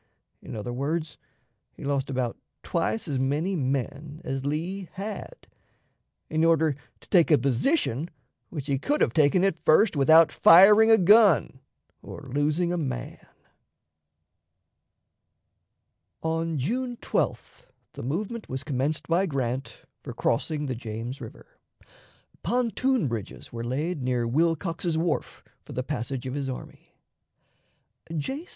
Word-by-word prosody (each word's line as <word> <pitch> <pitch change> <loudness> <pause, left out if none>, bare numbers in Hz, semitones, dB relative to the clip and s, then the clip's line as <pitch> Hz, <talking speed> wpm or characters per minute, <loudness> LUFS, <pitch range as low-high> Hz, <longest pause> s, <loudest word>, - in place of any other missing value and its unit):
In - - -8
other 110 +3 -5
words, 150 +4 -3 0.5
he - - -12
lost 140 -1 -1
about 125 -3 -2 0.3
twice 175 +5 -1
as 140 -4 -1
many 150 +9 0
men 140 +1 -3
as 135 0 -3
Lee 170 +6 -3
had, 210 - -7 0.8
in 155 +1 0
order 160 -3 +3 0.3
to - - -20
take 175 -5 +4
a 150 - +6
position 140 - 0 0.4
which 145 -6 -6
he 140 -2 -1
could 295 - 0
have - - +2
taken 155 +4 +3
at 195 -4 +1
first 180 +5 +4
without 160 +3 +6
firing 210 +6 +7
a 225 - +7
gun 195 - +5 0.4
or 140 -3 -10
losing 155 +5 +1
a 175 - -1
man." 130 -6 -5 3.0
On 165 0 -1
June 245 - -2
12th - - -3 0.3
the - - -8
movement 205 - -4
was 130 +1 -4
commenced 145 +1 -2
by 175 +4 +2
Grant 130 -2 -3 0.2
for - - -7
crossing 150 +5 -1
the 130 - -2
James 115 +2 -6
River. - - -10 1.0
Pontoon 250 - 0
bridges 115 -2 -6
were 115 0 -4
laid 145 +7 -2
near 125 -2 0
Wilcox's 165 +4 0
Wharf 165 -1 -2 0.2
for - - -10
the 125 - -2
passage 130 -2 -4
of 130 - -4
his 140 -1 -3
army. 130 - -9 1.2
J. 275 - -4
155 Hz, 130 wpm, -26 LUFS, 130-175 Hz, 3.0 s, firing